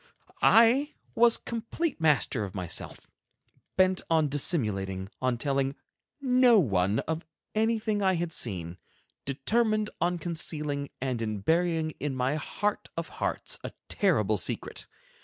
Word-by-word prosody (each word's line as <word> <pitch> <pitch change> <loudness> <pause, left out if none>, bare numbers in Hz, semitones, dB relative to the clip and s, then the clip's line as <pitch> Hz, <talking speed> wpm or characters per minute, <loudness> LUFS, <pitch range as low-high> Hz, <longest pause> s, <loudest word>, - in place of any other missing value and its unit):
I 245 +6 +5 0.2
was 235 0 +5
complete 235 - -3
master 145 -7 +2
of 95 -1 -7
myself, 90 -3 -5 0.7
bent 185 -1 +4
on 160 -3 +3
dissimulating, 100 - 0
on 130 -2 +1
telling 135 +1 0 0.4
no 250 -4 +5
one 100 - +2
of 160 +1 -3 0.3
anything 220 -1 +1
I 190 -1 +3
had 170 -1 -2
seen; 90 -6 -3 0.5
determined 215 - +1
on 175 +1 +1
concealing 150 -4 -3
and 130 -3 -1
in 110 -3 -3
burying 165 - +1
in 145 -2 -2
my 130 +2 0
heart 205 +7 -2
of - - -3
hearts - - -3
a - - -6 0.2
terrible 110 - +2
secret. 90 - -2
155 Hz, 125 wpm, -28 LUFS, -, 0.7 s, I